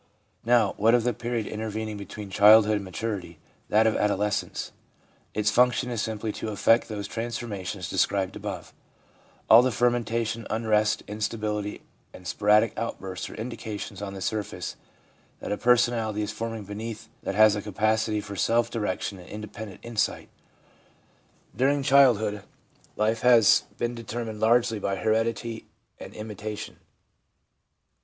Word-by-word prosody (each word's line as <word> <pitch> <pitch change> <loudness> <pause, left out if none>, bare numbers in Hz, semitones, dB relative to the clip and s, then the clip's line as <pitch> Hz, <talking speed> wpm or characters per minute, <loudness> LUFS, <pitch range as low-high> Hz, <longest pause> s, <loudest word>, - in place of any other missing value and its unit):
Now, 115 -4 +3
what 115 +3 +4
of 120 - +2
the 125 0 +1
period 120 0 -3
intervening 110 0 -4
between 100 0 -8
child 105 +3 +7
hood 105 0 +1
and 100 - -5
maturity, 100 +1 -5 0.3
that 110 +1 +4
of 110 - +2
adolescence? 105 0 -1 0.6
Its 105 0 +2
function 125 +1 +3
is 115 -3 -1
simply 110 0 -3
to 110 - -5
effect 115 +3 +3
those 105 -2 -4
transformations 105 -5 -4
described 95 +2 0
above. - - -6 0.7
All 115 +2 +9
the 130 - +2
fermentation, 115 -1 0
unrest, 110 -1 +1
instability 105 -1 -3 0.3
and 90 - -13
sporadic 105 +3 +3
outbursts 95 -5 -5
are - - -10
indications 110 -3 -6
on 100 -1 -5
the 95 - -7
surface 105 +1 -3 0.6
that - - -6
a - - +1
personality 115 -3 +2
is 105 - -3
forming 115 0 -5
beneath 105 +2 -7
that 95 - -3
has 110 0 +6
capacity 110 +1 0
for 100 0 -8
self 115 +5 +1
direction 100 -3 -3
and 90 - -13
independent 105 -1 -8
insight. 115 -2 -2 1.3
During 140 +2 +2
child 135 -4 +6
hood, 105 -1 -3 0.5
life 110 +1 0
has 120 -4 +6
been 120 0 -1
determined 115 -1 -5
largely 115 0 +3
by 100 -1 -1
heredity 115 +2 -1 0.3
and - - -10
imitation. 105 0 -6
110 Hz, 135 wpm, -26 LUFS, 105-115 Hz, 1.3 s, All